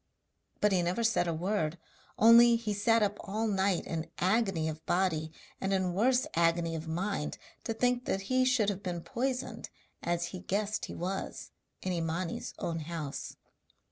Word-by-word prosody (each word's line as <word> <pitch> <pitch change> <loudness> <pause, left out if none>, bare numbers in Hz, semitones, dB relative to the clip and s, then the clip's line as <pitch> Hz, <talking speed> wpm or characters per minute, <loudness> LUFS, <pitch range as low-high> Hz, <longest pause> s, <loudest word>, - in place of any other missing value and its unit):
But 210 - +4
he 185 -2 +3
never 175 +7 0
said 225 -6 +2
a 170 - 0
word, 175 -2 -1 0.4
only 235 +1 +8
he 225 -2 -2
sat 225 +2 +3
up 205 0 0
all 215 +3 -2
night 195 -3 +1
in 160 -1 -4
agony 190 -4 +1
of 160 0 -5
body 165 -4 +1 0.3
and 195 - 0
in 185 -2 +1
worse 250 +6 +3
agony 165 0 +2
of 160 0 -5
mind 175 0 -2 0.3
to 225 - -1
think 245 +1 +1
that 195 - 0
he 255 +6 +2
should 250 -5 +3
have 200 -1 -3
been 175 -4 -3
poisoned, 260 +4 -3 0.3
as 170 0 -1
he 185 - -7
guessed 205 +3 -1
he - - -8
was, 190 +3 -4 0.3
in 185 - -1
Imani's 165 +1 -3
own 165 -1 -2
house. 155 -3 -5
190 Hz, 170 wpm, -31 LUFS, 170-220 Hz, 0.4 s, only